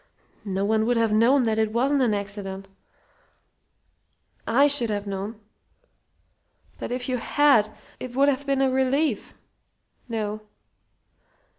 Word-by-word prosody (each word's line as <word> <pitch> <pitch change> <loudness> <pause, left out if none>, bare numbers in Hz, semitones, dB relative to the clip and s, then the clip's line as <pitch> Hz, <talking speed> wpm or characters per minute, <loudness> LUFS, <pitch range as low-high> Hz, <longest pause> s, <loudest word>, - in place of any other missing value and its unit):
No 195 +1 -1
one 220 +1 +1
would 245 -1 +2
have 225 -1 +2
known 240 +5 +4
that 220 -1 0
it 220 -1 +1
wasn't 270 +5 +1
an 230 -5 +2
accident 200 -1 -5 0.9
" - - -43
"I 255 +5 +4
should 280 -5 +3
have 205 -1 -2
known." 200 +2 -5 1.4
"But - - -5
if 250 0 -3
you 255 -1 -1
had, 275 -4 +3 0.3
it 250 -1 -7
would 275 +1 +4
have 280 0 0
been 275 -1 +1
a 265 - +2
relief 265 -1 0 0.4
" - - -43
"No. 210 0 -4
230 Hz, 140 wpm, -24 LUFS, 210-265 Hz, 1.4 s, known